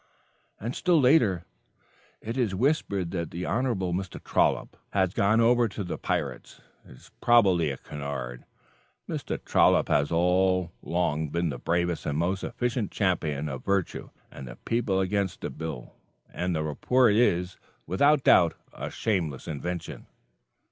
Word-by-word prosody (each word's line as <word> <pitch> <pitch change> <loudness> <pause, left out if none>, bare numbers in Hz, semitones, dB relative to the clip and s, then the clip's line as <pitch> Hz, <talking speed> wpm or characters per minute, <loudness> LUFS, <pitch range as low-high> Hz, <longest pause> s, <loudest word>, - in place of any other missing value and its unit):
And 120 +5 -4
still 175 -3 +3
later: 120 - +3 0.8
"It 115 +2 -5
is 115 -7 0
whispered 100 - 0
that 85 -3 -3
the 90 +1 -5
Hon. 125 +3 0 0.3
Mr. 95 0 -4
Trollop - - +1 0.2
has 95 -2 +1
gone 105 +3 +3
over 120 +1 +4
to 100 0 -5
the 90 - -5
pirates. - - -3 0.2
It - - -15
is 60 - -18
probably 95 -9 +4
a 70 - -4
canard. 65 -4 -6 0.6
Mr. - - -3
Trollop - - +4
has 70 +2 +2
all 90 +1 +2
along 80 -3 -1
been 85 +2 -1
the 65 - -5
bravest 85 +1 -1
and 75 - -1
most 90 +4 -1
efficient 120 -2 -2
champion 80 -7 -1
of 65 -3 -6
virtue 100 -2 -1 0.2
and 65 - -9
the - - -9
people 115 -5 0
against 95 -1 -1
the - - -4
bill, 75 -4 -7 0.4
and 90 0 -1
the 80 - -1
report 115 - +2
is 90 -6 +1 0.3
without 140 - +3
doubt 85 -2 +5 0.2
a - - -5
shameless 85 - -2
invention." 85 +3 -5
90 Hz, 150 wpm, -27 LUFS, 80-110 Hz, 0.8 s, doubt